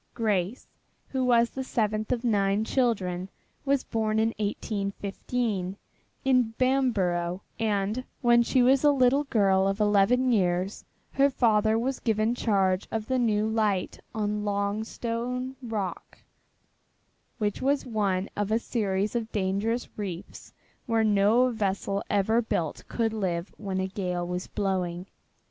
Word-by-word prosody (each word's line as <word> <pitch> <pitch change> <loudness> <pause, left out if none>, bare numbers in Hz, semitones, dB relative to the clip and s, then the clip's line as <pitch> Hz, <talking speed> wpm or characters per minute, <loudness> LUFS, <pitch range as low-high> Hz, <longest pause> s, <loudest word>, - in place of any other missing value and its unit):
Grace, 210 0 -1 0.4
who 265 -1 -1
was 235 -2 +4
the 265 - -4
seventh 215 -3 -1
of 245 -1 -1
nine 205 -2 +2
children, 195 -8 0 0.4
was 275 -1 +2
born 220 -1 -1
in 220 +1 +3
1815, 200 0 -2 0.5
in 250 -4 +3
Bamborough, 195 -9 +1 0.2
and 215 +2 0 0.2
when 240 -2 +5
she 245 +1 +3
was 265 +2 +4
a 295 - +6
little 275 +1 +3
girl 195 -6 +3
of 195 +1 -1
eleven 210 +5 +3
years 185 -2 0 0.3
her 275 +1 +4
father 220 -4 +3
was 255 +3 -1
given 220 0 +1
charge 195 -6 +1
of 220 -1 -3
the 260 +1 0
new 215 -3 +2
light 215 -4 0 0.2
on 210 -1 -1
Longstone 230 +5 -2
Rock, 215 -7 -4 1.2
which 210 -3 -2
was 275 +1 +1
one 200 -5 0
of 205 0 -2
a 220 - +4
series 210 -3 -1
of 230 -1 -2
dangerous 205 +4 -1
reefs 190 -4 -6 0.4
where 225 -1 +2
no 215 +4 +4
vessel 200 -2 -1
ever 215 +3 +2
built 170 -8 -2
could 225 -2 -1
live 180 -4 -2
when 195 -3 -3
a 190 - 0
gale 180 -2 -3
was 180 +1 -4
blowing. 185 -3 -2
215 Hz, 135 wpm, -27 LUFS, 195-240 Hz, 1.2 s, a